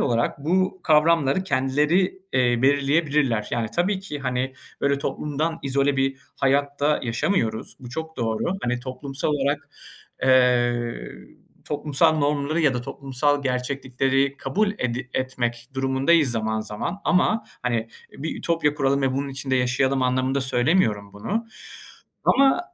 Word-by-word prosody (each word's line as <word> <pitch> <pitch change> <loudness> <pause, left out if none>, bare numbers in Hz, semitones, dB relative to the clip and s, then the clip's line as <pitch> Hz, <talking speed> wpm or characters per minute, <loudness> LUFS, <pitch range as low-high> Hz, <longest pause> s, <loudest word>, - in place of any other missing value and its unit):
olarak 120 +3 0
bu 185 +3 +1
kavramları 155 0 +3
kendileri, 150 +5 +1
eee, 120 -2 +2
belirleyebilirler. 140 -4 +2
Yani 115 -2 -1
tabii 190 +3 +1
ki 190 -7 -6
hani, 130 -1 -2 0.3
böyle 140 0 +2
toplumdan 150 +3 -2
izole 140 +1 +1
bir 135 0 +1 0.2
hayatta 140 +2 +1
yaşamıyoruz, 115 - -1
bu 125 - -9
çok 160 +3 -6
doğru. 115 +7 -1
Hani 125 0 -1
toplumsal 135 +3 -4
olarak, 145 0 -1 0.5
eee, 120 -2 +2 0.6
toplumsal 155 +2 +1
normları 145 +2 0
ya 145 -5 +3
da 125 - -1
toplumsal 140 +3 -1
gerçeklikleri 135 +1 0
kabul 200 +11 0
edi 125 +1 -3
etmek 120 -2 -2
durumundayız 135 +3 +3
zaman 110 -1 -1
zaman 110 - -5
ama 215 +4 +2 0.2
hani 115 -2 -1 0.2
bir 155 +4 -5
ütopya 165 -3 +1
kuralım 140 -1 +1
ve 135 - +1
bunun 140 +2 -2
içinde 135 -1 -2
yaşayalım 130 +1 +1
anlamında 130 +2 +1
söylemiyorum 120 - +1
bunu. 210 - -3 0.8
Ama 270 +5 +4
135 Hz, 125 wpm, -24 LUFS, 125-150 Hz, 0.8 s, Ama